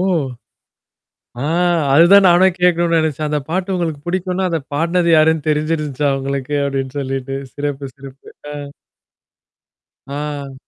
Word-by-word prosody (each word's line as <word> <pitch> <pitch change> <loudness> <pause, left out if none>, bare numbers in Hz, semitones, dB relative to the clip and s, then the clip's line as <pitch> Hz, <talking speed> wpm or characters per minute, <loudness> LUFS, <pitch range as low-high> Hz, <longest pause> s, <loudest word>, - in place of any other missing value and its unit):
ஓ! - - +1 1.4
ஆ, - - -2 0.5
அதுதான் 180 +6 +7
நானே 175 +2 +5
கேட்கணுன்னு 170 -1 +3
நினைச்சேன். 155 -1 -1
அந்த 150 0 0
பாட்டு 185 +2 -1
உங்களுக்கு 160 -5 -3
பிடிக்குன்னா, 185 +1 -1
அத 165 - 0 0.2
பாடுனது 170 +3 +1
யாருன்னு 155 -1 +3
தெரிஞ்சிருந்துச்சா 150 -2 0
உங்களுக்கு 140 +1 -3
அப்பிடின்னு 135 0 -3
சொல்லிட்டு, 135 0 -3 0.2
சிறப்பு, 145 -1 -4
சிறப்பு. 135 0 -13 0.2
அ. - - -6 1.6
ஆ. 145 -1 -5
150 Hz, 120 wpm, -18 LUFS, 140-170 Hz, 1.6 s, அதுதான்